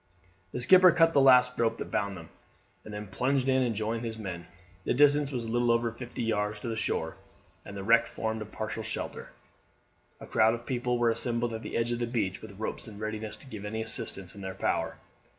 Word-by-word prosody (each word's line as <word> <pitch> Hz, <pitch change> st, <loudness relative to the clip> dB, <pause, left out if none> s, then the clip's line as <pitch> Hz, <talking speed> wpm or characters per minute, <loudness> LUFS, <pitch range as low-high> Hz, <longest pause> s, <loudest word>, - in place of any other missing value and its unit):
The -, -, -4 dB
skipper 185 Hz, +8 st, +7 dB
cut 165 Hz, -1 st, +4 dB
the 140 Hz, -, +5 dB
last 125 Hz, -1 st, +6 dB
rope 115 Hz, -1 st, +2 dB
that -, -, -7 dB
bound 100 Hz, 0 st, -1 dB
them, 80 Hz, -2 st, -11 dB, 0.5 s
and 110 Hz, -, -10 dB
then 105 Hz, 0 st, -5 dB
plunged 130 Hz, +7 st, 0 dB
in 130 Hz, 0 st, +3 dB
and 120 Hz, -3 st, 0 dB
joined 110 Hz, +2 st, -2 dB
his 115 Hz, -1 st, -4 dB
men. 90 Hz, -5 st, -6 dB, 0.4 s
The -, -, 0 dB
distance 145 Hz, +1 st, +4 dB
was 120 Hz, -4 st, -3 dB
little 120 Hz, +1 st, +1 dB
over 115 Hz, 0 st, +1 dB
fifty 120 Hz, +1 st, -6 dB
yards 105 Hz, -2 st, -1 dB
to 120 Hz, -, -4 dB
the 115 Hz, -, -2 dB
shore, 80 Hz, -7 st, -2 dB, 0.5 s
and 100 Hz, -, -9 dB
the 100 Hz, -, -5 dB
wreck 115 Hz, +2 st, +4 dB
formed 110 Hz, 0 st, -3 dB
a -, -, -4 dB
partial 110 Hz, +1 st, -5 dB
shelter. 110 Hz, 0 st, -4 dB, 0.9 s
A -, -, -9 dB
crowd 110 Hz, +1 st, +3 dB
of 120 Hz, 0 st, -10 dB
people 125 Hz, -1 st, -1 dB
were 120 Hz, -1 st, +3 dB
assembled 115 Hz, 0 st, 0 dB
at 110 Hz, -, -5 dB
the -, -, -4 dB
edge 115 Hz, +1 st, 0 dB
of 120 Hz, -, -1 dB
the 120 Hz, -, -1 dB
beach 105 Hz, -6 st, -2 dB
with 100 Hz, -3 st, -11 dB
ropes 110 Hz, +2 st, -4 dB
in 105 Hz, -2 st, -10 dB
readiness 110 Hz, 0 st, -4 dB
to -, -, -13 dB
give 110 Hz, -6 st, -8 dB
any 110 Hz, +2 st, -3 dB
assistance 100 Hz, -4 st, -1 dB
in 100 Hz, -, -10 dB
their 95 Hz, -1 st, -5 dB
power. -, -, -1 dB
115 Hz, 220 wpm, -29 LUFS, 105-120 Hz, 0.9 s, skipper